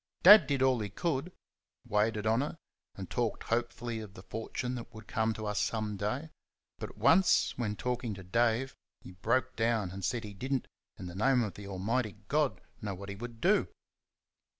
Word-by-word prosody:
Dad 205 +3 +10
did 140 -2 +1
all 130 -2 +4
he 105 -2 -3
could 155 - -2 0.5
waited 105 +1 +1
on 110 +3 +3
her, 150 +3 -4 0.4
and - - -6
talked - - -1
hopefully 120 0 -2
of 105 -3 -9
the 90 - -11
fortune 115 +5 -4
which 120 - -7
would 110 +1 -11
come 110 0 +1
to 110 - -5
us 105 0 -1
some 110 -2 -1
day; 120 +11 -3 0.5
but - - -7
once, 185 +2 +4
when 110 -4 -2
talking 120 -2 -2
to 95 - -9
Dave, 115 +6 +1 0.3
he - - -11
broke 120 +7 0
down, 115 -4 +1
and 95 +1 -7
said 115 +5 -1
he 105 -1 -7
did 130 +8 -3
n't, 130 - -1 0.3
in - - -7
the 90 - -7
name 125 +6 +3
of 105 - -3
the 100 -1 -9
Almighty 105 +4 -1
God, 150 -2 +1 0.2
know 100 -3 -3
what 100 +2 -8
he 100 - -5
would 115 +2 -8
do! - - +3
115 Hz, 195 wpm, -31 LUFS, 105-125 Hz, 0.5 s, Dad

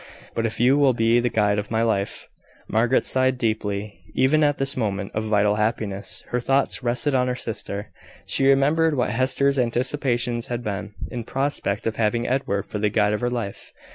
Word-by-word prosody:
But 115 0 0
if 110 0 -7
you 130 +4 +4
will 140 -3 +4
be 115 +1 +3
the 120 0 +1
guide 105 -2 +1
of 105 - -5
my 115 0 +1
life 100 -4 -1 0.2
" - - -30
Margaret 115 +4 +2
sighed 130 0 +2
deeply. 105 -5 -2 0.2
Even 140 +4 +3
at 145 -1 +2
this 135 +1 +1
moment 100 -5 -2
of 110 +1 -2
vital 105 -1 +2
happiness, 105 -1 -1
her 125 - 0
thoughts 135 +3 0
rested 125 +4 0
on 125 -1 +2
her 125 - -1
sister. 105 -3 -5 0.3
She 135 - +1
remembered 145 +3 +3
what 125 - +1
Hester's 130 +3 +2
anticipations 120 -1 0
had 120 0 -4
been, 105 -1 -5 0.2
in 120 -2 -4
prospect 135 -6 -2
of 110 -1 -2
having 115 +2 0
Edward 100 -7 -1
for 105 - -5
the 105 0 +1
guide 105 0 +2
of 105 - -2
her 120 - +1
life. 115 -5 -5
120 Hz, 195 wpm, -23 LUFS, 105-130 Hz, 0.3 s, you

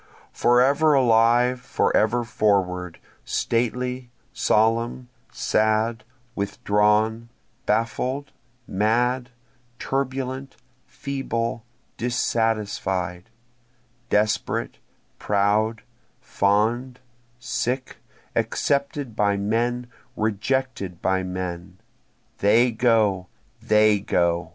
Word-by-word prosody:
Forever 140 +5 +4
alive, 120 0 +4
forever 120 -2 +1
forward, 90 -6 0 0.3
Stately, 125 +2 -1 0.2
solemn, 115 +3 +1 0.2
sad, 110 +1 +1 0.3
withdrawn, 105 +2 +1 0.4
baffled, 130 +4 -1 0.4
mad, 120 +5 +1 0.5
turbulent, 135 0 -3 0.3
feeble, 115 -5 -3 0.3
dissatisfied, 105 -7 -1 0.8
Desperate, 105 +1 0 0.4
proud, 105 +2 +1 0.4
fond, 115 +6 0 0.4
sick, 125 +2 -3 0.4
accepted 140 -3 -1
by 100 -2 +2
men, 120 +4 -1 0.3
rejected 110 -3 -2
by 95 0 +1
men, 90 -1 -5 0.6
They 115 +5 +4
go! 110 -5 +2 0.3
they 110 -2 +4
go! 85 -3 0
115 Hz, 65 wpm, -23 LUFS, 105-125 Hz, 0.8 s, Forever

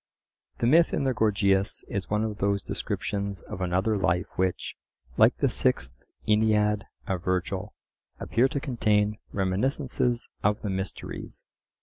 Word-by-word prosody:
The - - 0
myth 165 +7 +5
in - - 0
the 135 -1 +2
Gorgias 100 -3 +2
is 100 -1 -3
one 105 +1 +1
of 110 -1 -3
those 100 -1 +1
descriptions 100 -2 -3
of 95 - -7
another 95 +4 +1
life 90 -2 0
which, 95 -1 -1 0.4
like - - +5
the - - +2
Sixth 65 -1 0 0.3
Aeneid 105 -1 +3 0.2
of 90 -3 -2
Virgil, 90 -1 -2 0.4
appear 120 +3 +2
to 140 - -2
contain 105 -6 +1
reminiscences 120 +5 0
of 105 +1 +1
the 105 - -1
mysteries. 95 0 -5
105 Hz, 135 wpm, -27 LUFS, 95-110 Hz, 0.4 s, myth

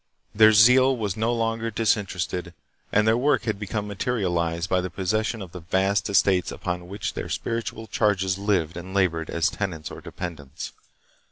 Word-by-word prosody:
Their 110 +1 +7
zeal 125 +4 +6
was 105 -4 -2
no 110 +2 0
longer 115 -1 -1
disinter 105 -3 0
ested, 85 0 -3 0.4
and 105 +1 +3
their 110 - +5
work 130 +2 +2
had 110 -3 -2
become 105 0 -3
materialized 90 -6 -1
by 90 0 +2
the 90 - -4
possession 110 +4 -1
of 90 - -11
the 90 - -8
vast 95 +4 0
estates 95 -2 +3
upon 90 -1 -4
which 100 +3 -4
their - - -5
spiritual 115 -1 -3
charges 100 -3 +1
lived 90 -5 0
and 95 +2 -8
labored 85 -4 +1
as 85 - +1
tenants 80 -7 -4
or - - -9
dependents. 75 -5 -7
100 Hz, 170 wpm, -25 LUFS, 90-110 Hz, 0.4 s, Their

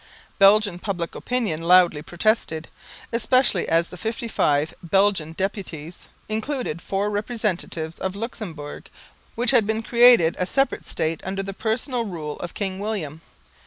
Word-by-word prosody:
Belgian 200 -2 +5
public 180 -4 -3
opinion 225 -11 -2
loudly 175 -3 +5
protested, 175 -2 -1 0.4
especially 235 -4 +2
as 165 +1 +2
the 180 - -10
55 195 -9 0
Belgian 185 -2 +1
deputies 180 -4 -5 0.2
included 220 - -3
four 200 +4 -1
representatives 205 -7 -2
of 190 0 -3
Luxemburg, 200 -10 -7 0.5
which 240 +2 +2
had 235 -6 +4
been 220 +1 -1
created 235 -8 +6
a 180 - 0
separate 270 +7 0
State 160 +1 -2
under 195 +1 -3
the 195 0 -5
personal 235 +4 -1
rule 160 -7 -5
of 175 - -7
King 190 -2 -3
William. 185 -8 -4
195 Hz, 130 wpm, -23 LUFS, 165-220 Hz, 0.5 s, created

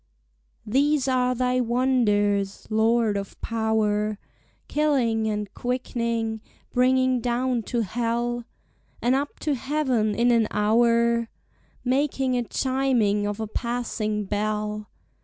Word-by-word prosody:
These 275 +4 +2
are 255 -1 +2
thy 250 +1 +1
wonders, 210 -5 +1
Lord 220 0 +2
of 200 -1 -5
power, 215 -2 0 0.5
Killing 250 -8 +1
and 210 -2 -3
quickning, 235 -3 -2 0.3
bringing 255 0 +3
down 245 +1 0
to 240 -2 -1
hell 235 +2 -2 0.5
And 245 +2 +2
up 280 +2 -1
to 300 - 0
heaven 260 -5 0
in 240 +1 +3
an 230 -2 +3
houre; 235 +2 +3 0.6
Making 265 0 +1
a 245 - +1
chiming 240 -5 +1
of 205 +1 -4
a 220 - -2
passing 220 -2 -2
bell. 210 +1 -2
235 Hz, 110 wpm, -25 LUFS, 215-255 Hz, 0.6 s, bringing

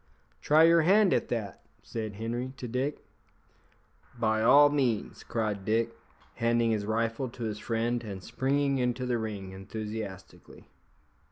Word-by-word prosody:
"Try 155 +2 +5
your 165 0 +6
hand 195 +4 +4
at - - +1
that," 110 -5 -4 0.2
said 110 -2 -5
Henri 120 +4 -4
to 125 - -6
Dick. 130 +5 -3 1.1
"By 110 -2 +1
all 145 +5 +7
means," 130 -7 -1
cried 105 -4 -2
Dick, 115 +2 0 0.4
handing 115 0 +2
his 105 -2 -1
rifle 115 +3 -1
to 120 0 -8
his 105 -2 -3
friend, 120 +2 -1
and 100 -4 -7
springing 140 +3 0
into 125 0 -1
the 120 -2 0
ring 100 -4 -5
enthusiastically. 105 0 -8
115 Hz, 140 wpm, -29 LUFS, 110-130 Hz, 1.1 s, all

